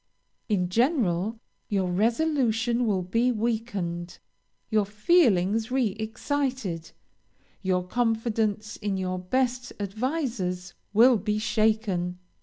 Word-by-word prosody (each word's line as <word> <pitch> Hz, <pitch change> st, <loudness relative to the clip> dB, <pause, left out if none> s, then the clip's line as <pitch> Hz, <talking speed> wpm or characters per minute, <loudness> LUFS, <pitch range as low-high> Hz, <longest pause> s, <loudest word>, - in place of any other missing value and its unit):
In 185 Hz, -4 st, +1 dB
general, 225 Hz, -, +1 dB, 0.3 s
your 190 Hz, -4 st, 0 dB
resolution 235 Hz, -, +1 dB
will 190 Hz, -4 st, +1 dB
be 230 Hz, +7 st, +1 dB
weakened, 210 Hz, -7 st, -2 dB, 0.5 s
your 215 Hz, -1 st, +4 dB
feelings 215 Hz, -, +3 dB
re 255 Hz, -3 st, +2 dB
excited, 220 Hz, -, -3 dB, 0.7 s
your 185 Hz, -2 st, 0 dB
confidence 220 Hz, -1 st, 0 dB
in 205 Hz, -2 st, -2 dB
your 185 Hz, -1 st, -2 dB
best 250 Hz, +6 st, -1 dB
advisers 205 Hz, -, -2 dB, 0.2 s
will 235 Hz, +4 st, +6 dB
be 210 Hz, +1 st, -1 dB
shaken. 215 Hz, -5 st, +1 dB
215 Hz, 95 wpm, -27 LUFS, 185-240 Hz, 0.7 s, will